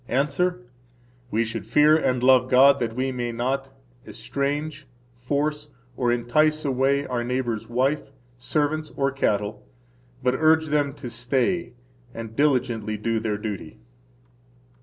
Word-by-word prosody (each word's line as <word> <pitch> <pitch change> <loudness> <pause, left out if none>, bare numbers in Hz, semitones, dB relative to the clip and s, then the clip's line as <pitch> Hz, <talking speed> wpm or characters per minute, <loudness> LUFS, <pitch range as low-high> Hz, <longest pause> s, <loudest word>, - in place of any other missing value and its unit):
–Answer: 145 +2 0 0.7
We 115 0 +1
should 110 -3 -5
fear 150 +6 +5
and 125 -5 0
love 130 -1 +5
God 140 +2 +6
that 115 -2 -2
we 130 +1 -1
may 120 -2 -3
not 130 +3 -2 0.3
estrange, 145 +1 -3 0.3
force, 145 +4 -2 0.3
or 120 -2 +1
entice 155 +6 +2
away 140 +1 +1
our 120 -2 -2
neighbor's 120 -3 -2
wife, 135 +6 0 0.3
servants, 150 +4 -1
or 140 0 +1
cattle, 105 -5 -1 0.6
but 125 0 +2
urge 160 +1 +3
them 145 -2 0
to 140 -4 -7
stay 130 +9 -1 0.4
and 115 -1 -7
[diligently] 120 -6 +1
do 115 +2 -1
their 110 -2 -2
duty. 105 - -6
130 Hz, 130 wpm, -24 LUFS, 120-145 Hz, 0.7 s, God